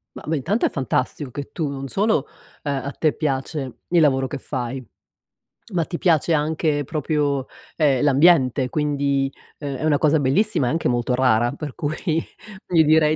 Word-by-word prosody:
Ma, -, -, -9 dB
beh, 160 Hz, 0 st, 0 dB
intanto 195 Hz, -, 0 dB
è -, -, +2 dB
fantastico 135 Hz, 0 st, -2 dB
che 140 Hz, +3 st, -7 dB
tu, 160 Hz, -4 st, -2 dB
non 135 Hz, -1 st, -5 dB
solo, 205 Hz, -, +1 dB, 0.4 s
ehm, 145 Hz, -, -1 dB
a 140 Hz, -, -4 dB
te 155 Hz, +1 st, 0 dB
piace 135 Hz, -2 st, -3 dB
il 175 Hz, -1 st, +4 dB
lavoro 135 Hz, -3 st, +3 dB
che 135 Hz, +1 st, -5 dB
fai, 130 Hz, -1 st, -4 dB, 0.9 s
ma 170 Hz, -2 st, +2 dB
ti 170 Hz, -, -5 dB
piace 165 Hz, -2 st, +2 dB
anche 150 Hz, -1 st, 0 dB
proprio, 145 Hz, -2 st, -1 dB, 0.3 s
ehm, 140 Hz, -5 st, +2 dB
l'ambiente. 140 Hz, -3 st, +4 dB
Quindi, 140 Hz, -1 st, 0 dB, 0.3 s
ehm, 140 Hz, -2 st, -5 dB
è 135 Hz, -, -5 dB
una 155 Hz, -2 st, +3 dB
cosa 155 Hz, +1 st, +3 dB
bellissima 145 Hz, -, +2 dB
e -, -, +1 dB
anche 165 Hz, 0 st, 0 dB
molto 120 Hz, 0 st, 0 dB
rara, 120 Hz, -2 st, +3 dB
per 145 Hz, -1 st, -7 dB
cui 150 Hz, +1 st, -2 dB, 0.7 s
io 165 Hz, -3 st, +5 dB
direi 155 Hz, 0 st, +4 dB
145 Hz, 175 wpm, -22 LUFS, 135-155 Hz, 0.9 s, io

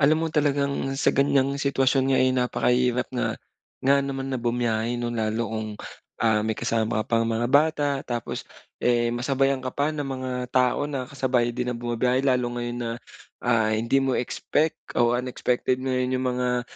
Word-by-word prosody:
Alam 155 Hz, +3 st, +4 dB
mo -, -, 0 dB
talagang 145 Hz, -2 st, +1 dB, 0.2 s
sa -, -, +2 dB
ganyang 140 Hz, 0 st, +2 dB
sitwasyon 135 Hz, -1 st, +2 dB
nga, -, -, +3 dB
eh, 130 Hz, 0 st, +3 dB
napakahirap 125 Hz, 0 st, +1 dB
nga 125 Hz, -, -1 dB, 0.5 s
nga 140 Hz, +1 st, +4 dB
naman 135 Hz, -1 st, -3 dB
na 130 Hz, -, -1 dB
bumiyahe 120 Hz, -1 st, 0 dB
'no, 120 Hz, 0 st, -2 dB
lalo 110 Hz, 0 st, -1 dB
kung, 110 Hz, -1 st, -3 dB, 0.5 s
ah, 110 Hz, -2 st, +3 dB
may 110 Hz, 0 st, -1 dB
kasama 110 Hz, -1 st, 0 dB
ka -, -, -16 dB
pang 115 Hz, -1 st, +2 dB
mga 115 Hz, +1 st, 0 dB
bata, 150 Hz, +1 st, +3 dB, 0.2 s
tapos, 120 Hz, -3 st, -4 dB, 0.3 s
eh, 120 Hz, -1 st, +2 dB
masabayan 135 Hz, +2 st, +1 dB
ka 130 Hz, -, -4 dB
pa 145 Hz, +2 st, +1 dB
ng 145 Hz, -2 st, -3 dB
mga 130 Hz, -1 st, -4 dB, 0.2 s
tao 130 Hz, +3 st, +2 dB
na 135 Hz, -3 st, -3 dB
kasabay 125 Hz, -3 st, 0 dB
din 125 Hz, 0 st, -2 dB
ang 115 Hz, -, -6 dB
bumibiyahe 125 Hz, +2 st, +1 dB
lalo 125 Hz, -2 st, +2 dB
ngayon 120 Hz, 0 st, -3 dB
na, 120 Hz, -1 st, -3 dB, 0.5 s
ah, 110 Hz, -3 st, +2 dB
hindi 115 Hz, +5 st, +2 dB
mo 135 Hz, -1 st, +1 dB
expect 150 Hz, +5 st, -1 dB, 0.2 s
o 120 Hz, 0 st, +4 dB
unexpected 125 Hz, 0 st, 0 dB
mo 130 Hz, -, -1 dB
'yung 125 Hz, 0 st, 0 dB
mga, 125 Hz, -1 st, 0 dB
125 Hz, 175 wpm, -25 LUFS, 120-135 Hz, 0.5 s, Alam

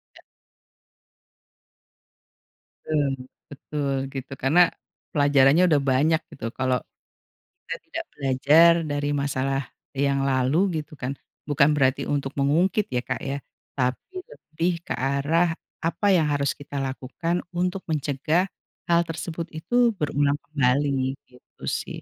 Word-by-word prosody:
Iya. -, -, -16 dB, 2.6 s
Betul 145 Hz, -3 st, +1 dB, 0.4 s
betul 140 Hz, -1 st, -3 dB, 0.2 s
gitu, 135 Hz, 0 st, -6 dB
karena 170 Hz, +6 st, +5 dB, 0.5 s
pelajarannya 145 Hz, +2 st, +5 dB
udah 145 Hz, -3 st, +4 dB
banyak 155 Hz, +5 st, +3 dB
gitu 125 Hz, -, -8 dB
kalau 130 Hz, -1 st, +1 dB, 0.8 s
kita -, -, -4 dB
tidak -, -, -4 dB
belajar 145 Hz, +5 st, +5 dB, 0.2 s
dari 145 Hz, 0 st, -1 dB
masalah 135 Hz, -1 st, 0 dB, 0.3 s
yang 140 Hz, 0 st, +1 dB
lalu 155 Hz, +7 st, +2 dB
gitu 150 Hz, -, -18 dB
kan, 130 Hz, +2 st, -3 dB, 0.3 s
bukan 145 Hz, 0 st, +4 dB
berarti 135 Hz, -1 st, +2 dB
untuk 140 Hz, -1 st, -2 dB
mengungkit 170 Hz, +9 st, +2 dB
ya 125 Hz, -, +1 dB
Kak -, -, -4 dB
ya, 140 Hz, +1 st, -2 dB, 0.4 s
tapi 130 Hz, -, -2 dB
lebih 155 Hz, +4 st, -2 dB
ke -, -, -3 dB
arah 145 Hz, +6 st, +1 dB, 0.3 s
apa 170 Hz, +5 st, -2 dB
yang 165 Hz, -5 st, +4 dB
harus 140 Hz, -1 st, +1 dB
kita 145 Hz, 0 st, -10 dB
lakukan 135 Hz, +6 st, -2 dB, 0.2 s
untuk 180 Hz, +2 st, -1 dB
mencegah 150 Hz, +4 st, +1 dB, 0.4 s
hal 170 Hz, 0 st, +5 dB
tersebut 165 Hz, 0 st, -5 dB
itu 240 Hz, +7 st, +2 dB
berulang 145 Hz, -2 st, +1 dB
kembali, 135 Hz, -1 st, +1 dB
gitu 125 Hz, 0 st, -21 dB
sih. -, -, -3 dB
145 Hz, 120 wpm, -25 LUFS, 135-165 Hz, 2.6 s, karena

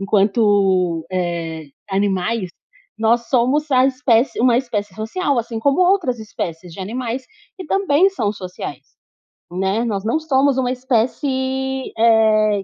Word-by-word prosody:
enquanto, 195 Hz, -4 st, +2 dB
eh, 170 Hz, -3 st, -3 dB, 0.3 s
animais, 195 Hz, +1 st, 0 dB, 0.5 s
nós 230 Hz, +1 st, +1 dB
somos 275 Hz, +4 st, +1 dB
a 255 Hz, 0 st, +5 dB
espécie 255 Hz, -2 st, +1 dB
uma 240 Hz, -1 st, +4 dB
espécie 210 Hz, -6 st, -4 dB
social, 260 Hz, -, -2 dB
assim 230 Hz, -1 st, -3 dB
como 280 Hz, +8 st, +1 dB
outras 360 Hz, -, +2 dB
espécies 175 Hz, -5 st, -6 dB
de 190 Hz, -, -9 dB
animais, 240 Hz, +5 st, -4 dB, 0.3 s
que 375 Hz, -, -8 dB
também 385 Hz, -1 st, +3 dB
são 215 Hz, -, -1 dB
sociais, 185 Hz, -3 st, -8 dB, 0.7 s
né. 190 Hz, +5 st, -1 dB
Nós 210 Hz, -3 st, -2 dB
não 235 Hz, +8 st, +1 dB
somos 280 Hz, -3 st, +2 dB
uma 250 Hz, -1 st, 0 dB
espécie, 260 Hz, +1 st, -1 dB
eh, 215 Hz, -2 st, +3 dB
230 Hz, 130 wpm, -19 LUFS, 200-265 Hz, 0.7 s, a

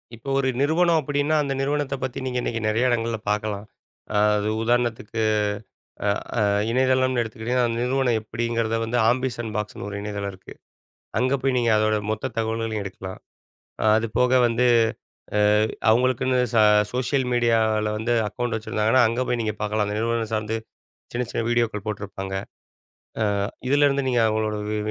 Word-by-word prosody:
இப்போ 120 Hz, +5 st, -9 dB
ஒரு 135 Hz, -1 st, +1 dB
நிறுவனம் 165 Hz, +3 st, +3 dB
அப்பிடின்னா, 145 Hz, +2 st, 0 dB
அந்த 140 Hz, -, -2 dB
நிறுவனத்த 145 Hz, 0 st, -1 dB
பத்தி 130 Hz, -1 st, -3 dB
நீங்க 125 Hz, -1 st, -1 dB
இன்னக்கி 115 Hz, -2 st, -2 dB
நிறையா 115 Hz, +4 st, +1 dB
இடங்கள்ல 115 Hz, -1 st, 0 dB
பார்க்கலாம். 105 Hz, -1 st, -2 dB, 0.5 s
அ -, -, +3 dB, 0.2 s
அது 105 Hz, +1 st, -1 dB, 0.2 s
உதாரணத்துக்கு, 115 Hz, -1 st, 0 dB, 0.9 s
அ, -, -, +4 dB, 0.3 s
அ -, -, +3 dB, 0.3 s
இணையதளம்னு 130 Hz, -1 st, +2 dB
எடுத்துக்கிட்டீங்கன்னா, 115 Hz, +2 st, -1 dB
அந்த 115 Hz, -, -2 dB
நிறுவனம் 125 Hz, -2 st, +1 dB
எப்பிடிங்கிறத 115 Hz, 0 st, -2 dB
வந்து 120 Hz, +2 st, -1 dB
ஆம்பிஷன் 120 Hz, -2 st, -1 dB
பாக்ஸ்னு 105 Hz, -1 st, -4 dB
ஒரு 100 Hz, -, -6 dB
இணையதளம் 100 Hz, -1 st, -4 dB
இருக்கு. 95 Hz, -, -13 dB, 0.7 s
அங்கே 130 Hz, +2 st, +2 dB
போய் 135 Hz, 0 st, +1 dB
நீங்க 120 Hz, -1 st, +2 dB
அதோட 110 Hz, 0 st, +2 dB, 0.2 s
மொத்த 110 Hz, -, -3 dB
தகவல்களையும் 110 Hz, -1 st, -1 dB
எடுக்கலாம். 95 Hz, -1 st, -8 dB, 0.8 s
அது 115 Hz, +1 st, -1 dB
போக 125 Hz, 0 st, +3 dB, 0.2 s
வந்து, 120 Hz, +2 st, +2 dB, 0.7 s
அ, -, -, +3 dB, 0.5 s
அவுங்களுக்குன்னு 130 Hz, +2 st, +2 dB, 0.2 s
ச 115 Hz, -, +2 dB, 0.4 s
சோஷியல் 130 Hz, +1 st, 0 dB
மீடியால 110 Hz, -3 st, +2 dB
வந்து 115 Hz, +2 st, 0 dB
அக்கவுண்ட் 120 Hz, +2 st, -3 dB
வச்சிருந்தாங்கன்னா, 110 Hz, +3 st, +2 dB
அங்க 120 Hz, +2 st, -1 dB
போய் 120 Hz, -, 0 dB
நீங்க 110 Hz, -1 st, -2 dB
பார்க்கலாம். 105 Hz, 0 st, 0 dB
அந்த 105 Hz, +1 st, -2 dB
நிறுவனம் 115 Hz, -1 st, -1 dB
சார்ந்து 110 Hz, +1 st, -1 dB, 0.6 s
சின்ன 125 Hz, +1 st, -1 dB
சின்ன -, -, -1 dB
வீடியோக்கள் 115 Hz, -3 st, 0 dB
போட்டிருப்பாங்க. 100 Hz, -2 st, -5 dB, 0.9 s
அ -, -, +3 dB, 0.4 s
இதுலேருந்து 140 Hz, -1 st, +3 dB
நீங்க 120 Hz, -1 st, +2 dB
அவுங்களோட 110 Hz, 0 st, 0 dB
வி 110 Hz, -, -1 dB
115 Hz, 150 wpm, -24 LUFS, 110-125 Hz, 0.9 s, அ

